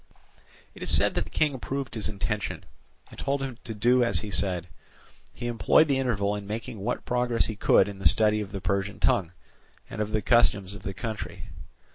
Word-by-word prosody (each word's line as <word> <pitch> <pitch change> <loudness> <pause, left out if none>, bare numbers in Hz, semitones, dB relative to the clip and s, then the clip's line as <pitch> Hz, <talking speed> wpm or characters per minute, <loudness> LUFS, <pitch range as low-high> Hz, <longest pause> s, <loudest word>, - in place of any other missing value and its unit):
It - - -14
is - - -3
said - - +5
that - - -1
the - - -12
King 150 -2 +1
approved 135 +1 -4
his 110 -2 -2
intention, 105 0 -3 0.5
and - - -12
told 140 +1 -1
him 130 -3 -6
to 115 -2 -6
do 120 +4 +3
as 115 - +3
he 105 - -6
said. 90 -4 +1 0.6
He - - -8
employed 120 +6 +4
the 135 -2 +1
interval 105 -6 0
in 100 -1 -7
making 110 0 -5
what 100 - -3
progress 120 -1 +1
he 110 - -4
could 105 - +4
in 100 -1 -7
the 95 - +5
study 105 -1 +2
of 100 -1 -6
the 100 -1 -5
Persian 100 +1 -1
tongue, 85 -4 +2 0.6
and - - -4
of 105 - -1
the 110 -2 0
customs 105 -5 +3
of 100 - -10
the 95 0 -6
country. 110 -1 -6
105 Hz, 205 wpm, -27 LUFS, 100-120 Hz, 0.6 s, said